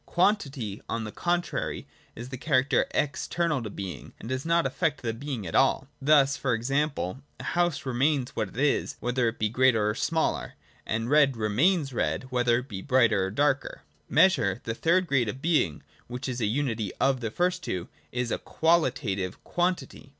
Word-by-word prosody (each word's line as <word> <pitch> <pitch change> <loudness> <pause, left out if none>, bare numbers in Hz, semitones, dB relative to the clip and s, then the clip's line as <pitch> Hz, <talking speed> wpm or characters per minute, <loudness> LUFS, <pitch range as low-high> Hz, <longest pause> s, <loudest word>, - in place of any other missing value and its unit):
Quantity, 140 - 0
on 115 - -2
the 110 - -6
contrary, 175 +5 -2 0.3
is 120 +3 -8
the 130 - -6
character 135 -2 +2
external 150 +1 -1
to 110 - -5
being, 95 -6 -7
and 115 - -8
does 130 +4 -3
not 170 0 +3
affect 145 -4 -1
the 115 -1 -1
being 130 -3 -5
at 85 - -6
all. 135 0 +3
Thus 140 -1 +4
e. 125 -4 +2
g. 120 +4 -4 0.6
a - - -9
house 175 -4 0
re 130 - -2
mains 135 0 +1
what 105 - -1
it - - -14
is, 145 +1 +1
whether 125 0 0
it 115 - -2
be 110 - +1
greater 115 -2 +3
or - - -3
smaller; 160 +7 -1 0.3
and 115 +1 -1
red 140 -4 +4
remains 135 - +2
red, 80 -9 -1
whether 120 -1 +3
it 125 +2 -5
be 100 -6 -6
brighter 120 -7 +3
or - - -2
darker. 140 +6 0 0.3
Measure, 150 - +4
the 115 - -2
third 170 +9 +2
grade 130 -8 +1
of 130 - -5
being, 145 - +1 0.2
which 125 +3 -5
is 125 -1 -3
the 110 - +1
unity 115 -4 -1
of 135 -1 +2
the 115 -2 -3
first 180 +8 0
two, 90 -1 -3 0.2
is 125 -1 -2
a - - -1
qualitative 120 - 0
quantity. 175 -5 -2
130 Hz, 185 wpm, -27 LUFS, 115-150 Hz, 0.6 s, Thus